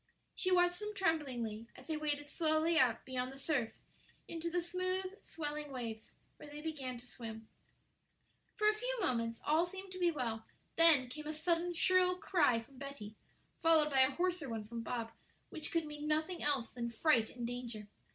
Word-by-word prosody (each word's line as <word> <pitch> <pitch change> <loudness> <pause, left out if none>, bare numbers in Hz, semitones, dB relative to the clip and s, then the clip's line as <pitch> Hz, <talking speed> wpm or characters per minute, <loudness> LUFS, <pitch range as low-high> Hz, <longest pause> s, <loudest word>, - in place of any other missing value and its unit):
She 370 - +1
watched 355 -1 +4
them 420 0 -5
tremblingly 255 - -1
as 255 - -12
they 315 - -2
waded 295 -1 -2
slowly 320 +1 +2
out 240 -4 +3
beyond 255 0 -2
the 270 - -10
surf 270 -5 0 0.6
into 335 0 -3
the 355 +1 +1
smooth, 370 +2 -1 0.2
swelling 295 -2 -4
waves, 230 -4 -6 0.2
where 295 - -11
they 295 0 -7
began 285 -5 -4
to 240 - -12
swim. 225 -3 -8 1.1
For 425 - +2
a 425 - +6
few - - -2
moments 230 - 0
all 320 +4 +3
seemed 380 +1 -8
to 370 - -7
be 350 -1 +4
well; 235 -8 -2 0.3
then 325 -6 +7
came 300 +4 -7
a 310 - -2
sudden 340 +2 +1
shrill 365 +1 +4
cry 295 -11 +3
from 255 +3 -16
Betty, 275 -7 -7 0.5
followed 320 -2 +5
by 270 - +3
a 260 - +6
hoarser 350 -1 -1
one 220 -2 -4
from 230 +1 -5
Bob, 230 0 -3 0.4
which 310 -2 -3
could 330 -1 +1
mean 295 0 -6
nothing 315 +4 0
else 280 -5 +1
than 235 -1 -3
fright 230 -1 +3
and 240 -1 -5
danger. 235 -3 -5
295 Hz, 180 wpm, -35 LUFS, 245-340 Hz, 1.1 s, then